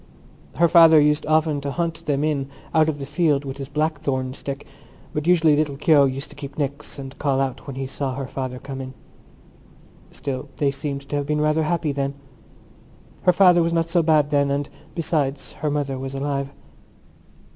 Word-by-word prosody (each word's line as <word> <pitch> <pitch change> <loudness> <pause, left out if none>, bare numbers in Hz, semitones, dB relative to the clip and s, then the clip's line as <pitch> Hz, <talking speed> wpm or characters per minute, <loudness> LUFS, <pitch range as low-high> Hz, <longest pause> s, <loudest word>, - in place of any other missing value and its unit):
Her 170 - +4
father 165 -2 +7
used 150 +1 +2
often 155 -2 +2
to 140 - -3
hunt 165 +2 -3
them 145 -1 +1
in 145 -3 -1 0.2
out 160 -1 +4
of 150 - -2
the 140 - -6
field 150 -3 +1
with 135 0 -5
his 135 -1 -6
blackthorn 145 -4 -1
stick; 140 0 -6 0.5
but 150 +2 -2
usually 165 -4 +5
little 145 -2 0
Keogh 150 -1 +5
used 135 +2 -3
to - - -12
keep 140 -1 -9
nix 145 0 -3
and 135 0 -8
call 140 -3 +1
out 135 0 -2
when 140 - -6
he 135 0 -3
saw 135 0 -3
her 135 0 -4
father 130 -1 -5
coming. 135 0 -7 1.1
Still 140 0 -5
they 140 -2 +2
seemed 140 0 -5
to - - -2
have 145 -1 -2
been 150 0 0
rather 155 +1 +2
happy 160 -1 0
then. 140 0 -2 1.1
Her 180 - +7
father 180 -2 +6
was 165 0 +1
not 165 0 +1
so 170 0 +3
bad 155 -2 +3
then; 140 -1 +2
and 140 0 -1 0.3
besides, 150 -5 -1
her 150 - +1
mother 140 -2 -2
was 135 +1 -5
alive. 140 0 -2
145 Hz, 190 wpm, -23 LUFS, 135-155 Hz, 1.1 s, father